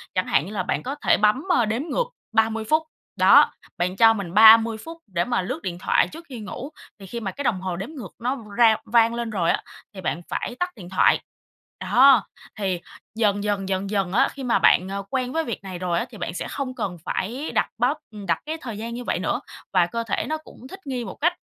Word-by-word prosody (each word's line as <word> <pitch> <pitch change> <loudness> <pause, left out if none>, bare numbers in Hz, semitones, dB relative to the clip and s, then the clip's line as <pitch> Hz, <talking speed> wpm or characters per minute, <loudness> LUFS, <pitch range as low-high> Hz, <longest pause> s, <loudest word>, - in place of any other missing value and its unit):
chẳng 185 - 0
hạn 135 +3 +2
như 195 - -8
là 190 -3 -1
bạn - - -2
có 270 +3 -4
thể - - +4
bấm, 215 +6 +2 0.2
a, 235 - +3
đếm 225 +4 -1
ngược 405 +10 -1 0.3
30 225 0 +2
phút, 315 +1 +3 0.3
đó, - - +7 0.3
bạn 180 +1 -1
cho 225 +1 +7
mình 195 -6 -5
30 225 +2 +8
phút 330 0 -8
để 175 -3 -1
mà 240 -4 0
lướt 180 - -4
điện 180 -3 -4
thoại - - +2
trước 330 +2 -11
khi 250 - -7
ngủ. 230 +6 -7 0.3
Thì 195 - -10
khi 235 +5 -5
mà 200 -4 -4
cái 285 - -6
đồng 190 -7 0
hồ 185 -2 -3
đếm 195 +7 -5
ngược 260 - -9
nó 250 +4 -1 0.2
rao 225 -2 +6
vang 230 +1 +4
lên 235 -1 -3
rồi 180 -6 +1
á, - - -2 0.3
thì 190 - -8
bạn 175 - -2
phải 245 - -3
tắt 360 - 0
điện 180 -6 -11
thoại, 190 - +4 0.6
đó, 270 +2 +5 0.3
thì 185 -4 -1 0.3
dần, 205 -2 +1
dần 200 -2 -1
dần 195 +1 -1
dần 195 -3 -1
á, 235 - +4
khi 275 - -8
mà 245 - +2
bạn, 185 +2 +4
à, 200 - -3
quen 255 0 -2
với 325 0 +1
việc 235 -6 -5
này 185 -2 -7
rồi 175 -2 0
á, - - -2
thì 225 - -12
bạn - - -4
sẽ - - -4
không 265 -2 -4
cần 180 -7 -3
phải 250 +10 -3
đặt - - +1
báo 245 +5 +2 0.2
ừm, 210 -2 -9
đặt 175 - 0
cái 315 +2 -3
thời 230 -5 -6
gian 230 +2 -5
như 245 - -5
vậy - - -1
nữa. - - -1 0.3
Và 180 -2 +5
cơ 230 +5 -3
thể 225 - -2
nó 315 - -1
cũng 265 -4 -14
thích 385 - -10
nghi 250 -3 -3
một - - -7
cách 345 +4 +1
225 Hz, 250 wpm, -24 LUFS, 190-250 Hz, 0.6 s, 30